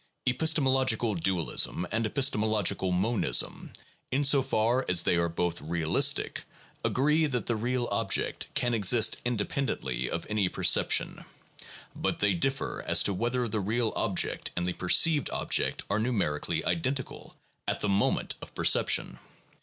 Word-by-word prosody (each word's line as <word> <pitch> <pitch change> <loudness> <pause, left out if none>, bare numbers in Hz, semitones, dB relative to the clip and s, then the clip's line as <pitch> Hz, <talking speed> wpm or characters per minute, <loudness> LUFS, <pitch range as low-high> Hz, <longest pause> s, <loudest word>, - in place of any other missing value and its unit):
Epistemological 130 -5 +1
dualism 90 -1 -1
and 115 0 0
epis 140 +4 +2
temological 105 -3 0
monism, 100 +5 +1 0.4
in 140 +3 +1
so 140 0 +5
far 120 +1 0
as 90 -2 +5
they - - +2
are 85 0 +1
both 85 -1 -2
realistic, 80 +1 +1 0.4
agree 150 +4 +2
that 125 -4 -3
the 120 - 0
real 120 +2 -2
object - - -1
can 120 -1 0
exist 110 +1 +3
independently 105 - -2
of 85 - -4
any 105 -3 0
perception; - - +1 0.7
but - - -2
they 105 -1 +2
differ 135 +10 -2
as - - +4
to 100 - +1
whether 120 +5 -1
the 110 0 -2
real 110 +3 -1
object - - -1
and 90 - -1
the 90 - -1
perceived 145 - +3
object - - -1
are 105 - -1
numerically 105 -11 -1
identical 135 -5 -3 0.3
at - - -2
the - - 0
moment 100 +1 +1
of - - -11
perception. - - +1
110 Hz, 140 wpm, -28 LUFS, 90-130 Hz, 0.7 s, so